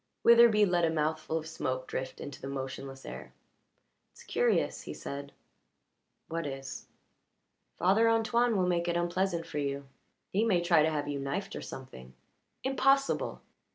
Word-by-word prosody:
Witherbee 235 -3 +7
let 175 -1 +2
a 165 - +4
mouthful 155 0 -1
of 160 - -4
smoke 130 -5 -3
drift 130 - -4
into 140 -1 -8
the - - -5
motionless 135 0 -6
air. - - -8 0.8
"It's - - -16
curious," 480 0 +1
he - - -7
said. 140 0 -6 1.0
"What 165 -1 -3
is?" 135 -1 -6 0.9
"Father 200 +6 +4
Antoine 230 0 +2
will 185 - +2
make 175 -1 +1
it 170 0 +1
unpleasant 175 0 0
for 150 - -4
you. 140 0 -2 0.5
He 205 +4 +3
may 205 -6 +3
try 170 -2 +4
to 155 - +3
have 145 -2 -2
you 145 -1 -2
knifed, 140 +9 -3
or - - -5
something." 65 - -10 0.5
"Impossible!" 270 +1 +2
165 Hz, 155 wpm, -30 LUFS, 140-205 Hz, 1.0 s, Witherbee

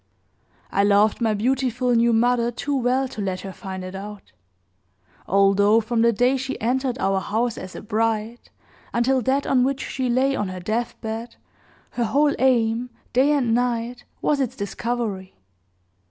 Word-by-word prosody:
I 200 - +2
loved 205 +3 +3
my 220 -2 +2
beautiful 250 +2 0
new 235 0 +4
mother 235 +1 +2
too 280 +4 -3
well 260 +1 +1
to 220 - -6
let 185 -2 -2
her 195 -1 -7
find 190 -2 -7
it 185 0 -7
out; 200 +1 -9 1.0
although 200 +3 +4
from 230 +1 -1
the 235 0 +5
day 245 +5 +2
she 265 +1 -4
entered 255 +2 0
our 195 -2 +1
house 225 +4 -1
as 185 0 -8
a - - -8
bride, 225 +2 -2 0.5
until 255 +2 +2
that 265 +4 0
on 255 -2 +3
which 275 +1 -1
she 260 -2 -2
lay 265 +3 +2
on 205 - -1
her 185 0 -6
deathbed, 225 +3 -4 0.6
her 240 - -1
whole 285 +5 +2
aim, 240 -2 +2 0.2
day 265 +4 +4
and 255 -6 +2
night, 240 0 -1 0.2
was 295 -2 +2
its 260 -4 -1
discovery. 205 -2 -4
235 Hz, 160 wpm, -23 LUFS, 210-255 Hz, 1.0 s, the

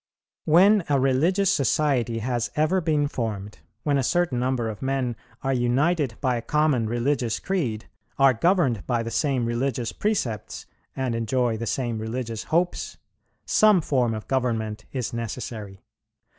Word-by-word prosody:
"When 190 +5 +5
a 140 -2 +3
religious 165 +9 +2
society 135 - +1
has 120 +1 -1
ever 155 +5 +2
been 150 -3 +1
formed, 105 -6 -4 0.2
when 145 -2 +2
a - - 0
certain 170 -3 +1
number 125 -2 0
of 110 -2 -6
men 130 -3 -1 0.3
are 135 0 +1
united 130 +2 +1
by 125 -3 +1
a - - -3
common 145 -2 +1
religious 120 0 0
creed, 130 - -2 0.3
are 135 -1 +5
governed 135 - +2
by 120 -2 0
the 115 - -5
same 135 -2 0
religious 120 0 -1
precepts, 130 - -2 0.3
and 130 -3 -1
enjoy 115 +1 0
the 115 +1 -4
same 120 0 -2
religious 115 0 -4
hopes, 175 +2 -1 0.5
some 215 -3 +5
form 125 -7 0
of 110 - -7
government 115 -5 -1
is 125 -4 -3
necessary. 110 -4 -6
125 Hz, 145 wpm, -25 LUFS, 115-150 Hz, 0.5 s, When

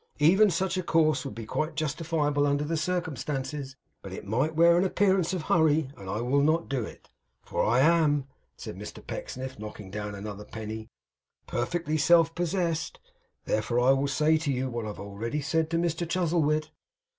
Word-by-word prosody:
Even 190 +8 +5
such 185 +1 0
a - - +1
course 155 -5 +2
would - - -6
be 115 -1 -6
quite 155 +8 -2
justifiable 150 -1 0
under 145 +1 +1
the 160 +3 -1
circumstances; 145 -5 -3 0.3
but 95 - -9
it 95 - -7
might 130 +10 0
wear 170 +1 +6
an 175 - +3
appearance 190 -2 +2
of 180 -4 -2
hurry, 155 -4 +2
and 95 -1 -9
I 105 +4 -2
will 130 +4 +2
not 160 +3 +2
do 135 -4 -1
it; - - -11 0.3
for - - -1
I 120 +4 +3
am,' 150 -3 +3 0.3
said - - -7
Mr - - -9
Pecksniff, 130 -2 -6
knocking 105 -2 -8
down 105 0 -4
another 100 0 -7
penny, 110 +1 -7 0.6
'perfectly 155 +5 -1
self 165 +1 +5
possessed. 175 -2 -1 0.5
Therefore 115 +3 0
I 125 +2 +5
will 135 +1 +2
say 155 +3 +3
to 155 -2 -1
you, 130 0 -1
what 120 -1 -3
I - - -4
have 105 - -7
already 105 +7 -4
said 160 +2 0
to 165 - 0
Mr 170 0 -1
Chuzzlewit. 155 -3 +1
150 Hz, 180 wpm, -28 LUFS, 125-165 Hz, 0.6 s, wear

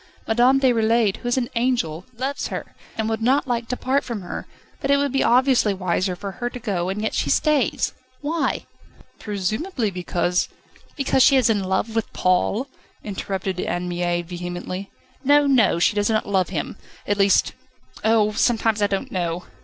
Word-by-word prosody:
Madame 245 +4 +4
Déroulède, 230 -5 +3
who 245 - -7
is 245 - +1
an 245 -2 0
angel, 230 -9 0
loves 270 +3 -2
her, - - -6 0.2
and 220 -1 -1
would 225 0 -2
not 265 +5 +2
like 235 -2 -1
to 250 - -3
part 270 +2 +1
from 225 -6 -5
her, 175 - -6 0.3
but 275 - -3
it 280 - +5
would 285 -1 0
be 270 - +1
obviously 250 -4 +3
wiser 185 0 -1
for 200 +2 -6
her 240 +5 -4
to 250 - -8
go, 195 -7 -2
and 205 +3 -3
yet 220 - -1
she - - 0
stays. 300 -5 +2 0.3
Why?" 320 +3 -1 0.5
"Presumably 215 - -2
because 180 0 0 0.2
..." - - -28
"Because 270 -1 +2
she 275 - +6
is 245 -4 +4
in 205 -3 0
love 190 +4 -1
with 225 - -1
Paul?" 185 +7 +1 0.4
interrupted 190 -2 -3
Anne 175 0 -2
Mie 175 0 -1
vehemently. 175 +2 -6 0.3
"No, 290 +2 +5
no; 255 -10 +4
she 170 - +3
does 205 +1 +1
not 220 -1 0
love 190 -3 +1
him 175 +1 -4 0.3
at 205 0 -1
least 195 0 +4 0.5
Oh! 220 -1 +3
sometimes 225 -1 +1
I 205 - +4
don't 195 -1 -3
know. 175 -1 -2
215 Hz, 180 wpm, -22 LUFS, 185-250 Hz, 0.5 s, she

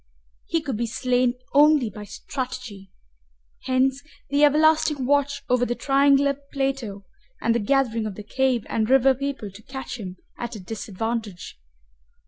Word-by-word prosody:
He 330 - 0
could 270 -7 -3
be 235 +1 -1
slain 250 +1 +1 0.2
only 290 -5 +5
by 210 0 -9
strategy. 250 -5 -6 0.8
Hence 260 +1 +1 0.3
the 285 +1 +3
everlasting 305 -1 +4
watch 285 +1 +1
over 250 0 +2
the 240 0 0
triangular 280 +1 +3 0.2
plateau 270 -8 -2 0.3
and 230 - +1
the 235 - +1
gathering 230 -1 +1
of 205 - -6
the 210 - -8
cave 255 +1 0
and 220 0 -1
river 270 0 +5
people 270 -6 -4
to 195 +3 -13
catch 265 0 -7
him 185 -3 -7 0.2
at 240 -1 -5
a - - -7
disadvantage. 220 0 -5
255 Hz, 145 wpm, -24 LUFS, 220-275 Hz, 0.8 s, only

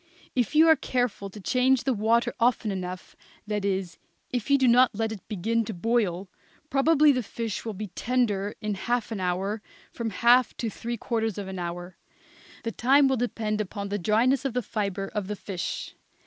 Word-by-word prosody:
If 245 +1 0
you 320 +2 +7
are 320 - +8
careful 245 -8 -2
to 210 - -11
change 255 +4 +2
the 265 - +1
water 225 +2 +2
often 230 -3 +2
enough, 185 -1 -6 0.3
that 210 -1 -2
is, 190 -3 -2 0.3
if 245 -2 -2
you 280 - +6
do 260 -2 +3
not 245 -1 +5
let 225 +1 -1
it 215 -4 -6
begin 225 +3 0
to 215 - -5
boil, 200 -2 0 0.4
probably 300 +2 +5
the 255 -2 0
fish 225 -1 -4
will 220 -3 -5
be 210 +1 -5
tender 210 -1 0
in 210 -1 -1
half 235 +4 -2
an 215 - -3
hour 190 +4 -1 0.3
from 230 -1 -3
half 240 +4 +4
to 230 -3 -2
three 235 +3 -5
quarters 225 -2 -2
of 200 -2 -5
an 190 -1 -5
hour. 175 +1 -5 0.7
The 230 - -2
time 270 +5 +4
will 265 -1 +1
depend 220 -3 -1
upon 200 0 -5
the 205 +1 -2
dryness 230 +7 +2
of 270 -3 -2
the 250 - 0
fibre 200 -2 -3
of 210 -3 -2
the 210 - -3
fish. 190 -3 -5
220 Hz, 190 wpm, -26 LUFS, 200-245 Hz, 0.7 s, are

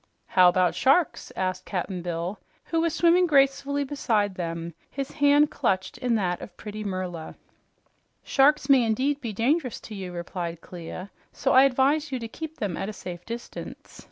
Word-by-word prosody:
"How 180 -1 +6
about 180 0 +2
sharks?" 280 +6 +2
asked 185 0 -2
Cap'n 185 -1 -3
Bill, 175 +3 -3 0.2
who 330 -1 0
was 335 0 +1
swimming 350 +1 +4
gracefully 280 -1 +3
beside 225 -8 0
them, 170 -1 -4 0.2
his 275 -1 -5
hand 290 0 +4
clutched 190 +4 -1
in 245 -2 +1
that 180 -4 -1
of 180 - -10
pretty 215 0 -6
Merla. 185 -4 -4 0.9
"Sharks 295 +2 +3
may 270 -3 +6
indeed 260 +6 0
be 235 -3 -3
dangerous 250 - 0
to 220 - -10
you," 190 -3 -6
replied 170 -1 -5
Clia, 180 +3 -8 0.2
"so - - 0
I 260 +1 +8
advise 275 +3 +2
you 260 - -1
to 230 -2 -5
keep 315 +6 -8
them 200 -5 -2
at 195 - -3
a - - -5
safe 180 -3 -8
distance. 235 +1 -8
220 Hz, 170 wpm, -26 LUFS, 185-275 Hz, 0.9 s, I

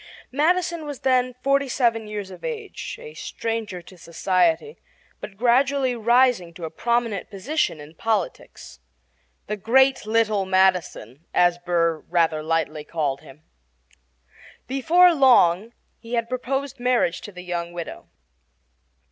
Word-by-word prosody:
Madison 335 +3 0
was 285 -3 -7
then 255 -1 +1
forty 275 0 +2
seven 230 -4 +1
years 205 -2 -6
of - - -12
age, 455 -3 -6
a 465 -1 -10
stranger 220 -6 -4
to 180 +1 -16
society, 195 - 0 0.4
but 195 - -9
gradually 255 +2 +2
rising 235 -6 +2
to 170 - -6
a 160 - -6
prominent 235 -4 -1
position 210 - -2
in 150 +2 -12
politics 200 - -4 0.7
"the 210 - -3
great 260 +3 +3
little 215 -2 +2
Madison," 185 - 0
as 175 0 +3
Burr 170 -2 0
rather 165 -3 +1
lightly 155 -1 -1
called 145 -3 -2
him. 150 0 -16 1.2
Before 295 +8 +4
very 340 -4 +4
long 225 -5 +4 0.3
he 230 +1 -10
had 230 -1 -1
proposed 270 +2 -3
marriage 245 -8 +1
to 205 - -9
the 180 -1 -10
young 175 -1 -4
widow. 170 -1 -7
220 Hz, 130 wpm, -23 LUFS, 175-260 Hz, 1.2 s, Before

